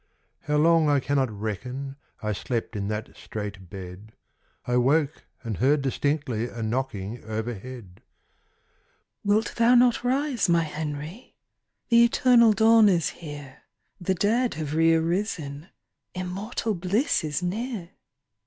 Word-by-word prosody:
How 150 0 +1
long 165 0 +4
I 145 -1 +4
cannot 135 -1 0
reckon, 125 +6 -5 0.3
I 105 - -1
slept 115 +2 -3
in 100 -1 -2
that 105 +1 -4
strait 105 -4 -7
bed; 95 +3 -9 0.5
I 125 0 +1
woke 145 +4 +1 0.2
and 110 -5 -4
heard 140 +3 +2
distinctly 135 -4 -1
A 115 -1 -6
knocking 110 -2 -3
overhead. 110 -2 -6 1.2
"Wilt 210 +2 +1
thou 235 +1 +5
not 245 -1 +4
rise, 255 -4 0
my 170 -1 +4
Henry? 155 - -6 0.5
The 235 0 +6
eternal 235 -1 +5
dawn 220 0 +6
is 175 -4 +2
here; 145 -4 -10 0.4
The 190 +1 0
dead 230 +7 +1
have 150 -2 -4
re 165 +1 +4
arisen, 165 -3 -2 0.5
Immortal 195 +5 -3
bliss 195 - 0
is 155 +3 -2
near." 205 -1 -3
150 Hz, 125 wpm, -26 LUFS, 120-200 Hz, 1.2 s, The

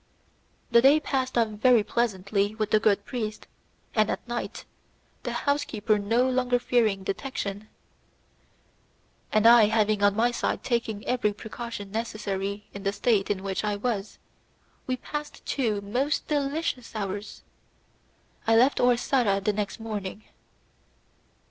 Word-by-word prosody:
The 235 0 +6
day 280 +4 +6
passed 260 -4 -2
off 230 -2 +3
very 220 +2 +4
pleasantly 205 -2 0
with 215 -1 -2
the 215 - +5
good 205 -2 +2
priest, 215 -4 -4 0.5
and 215 -1 +2
at - - -4
night, 240 0 -5 0.6
the - - -4
house 285 0 0
keeper 215 -1 0
no 230 +5 +2
longer 250 -1 +2
fearing 225 -5 +1
detection, 205 -1 -4 1.6
and 215 0 +2
I 230 -1 +8
having 215 -1 +2
on 205 0 +4
my 235 +3 +3
side 240 - -2
taken 225 -4 -1
every 240 -4 +1
precaution 220 -2 -7
necessary 205 -2 -3
in 200 - -7
the 195 0 0
state 205 -1 +1
in 195 -2 -1
which 195 0 -2
I 210 -1 0
was, 210 -2 -3 0.7
we 255 0 -1
passed 295 +3 -7
two 220 -7 0
most 250 +9 -1
delicious 285 -4 -2
hours. 205 0 -5 1.0
I 225 - +5
left 255 +5 +4
Orsara 245 -4 +2
the 205 +2 0
next 205 +2 -3
morning. 215 -2 -5
220 Hz, 135 wpm, -26 LUFS, 205-245 Hz, 1.6 s, I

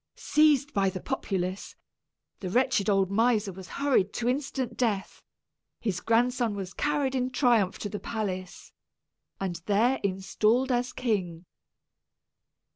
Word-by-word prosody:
Seized 300 -1 +3
by 195 -1 +2
the 185 0 -5
populace, 190 -5 -3 0.6
the 185 - -4
wretched 245 -1 +2
old 195 -1 +2
miser 215 -2 +2
was 185 0 -10
hurried 265 -9 +1
to 235 - -2
instant 260 -2 -2
death; 210 -6 -1 0.6
his 195 -6 -2
grandson 235 -1 +1
was 190 -2 -5
carried 290 -2 0
in 255 -1 0
triumph 240 -7 +2
to - - -4
the 205 0 -5
palace, 185 -5 -5 0.7
and 185 -3 -2
there 230 +6 +3
installed 210 +7 +1
as 245 0 0
king. 185 -10 -2
220 Hz, 125 wpm, -28 LUFS, 195-255 Hz, 0.7 s, Seized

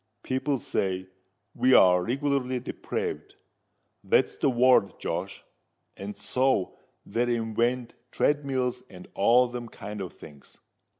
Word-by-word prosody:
People 135 +2 -1
say 95 -5 -2 0.4
we're 105 -8 +5
reglarly 130 +2 -1
depraved—that's 125 - -4
the - - +2
word, 125 -5 +3
Josh—and 100 +1 -7
so 130 -7 0 0.3
they 120 +3 0
invent 120 +2 -1 0.2
treadmills 130 -3 0
and 90 -1 -12
all 120 +5 +4
them 120 -1 -7
kind 105 -1 -7
of 90 - -6
things. 70 -3 -15
120 Hz, 100 wpm, -27 LUFS, 100-130 Hz, 0.4 s, we're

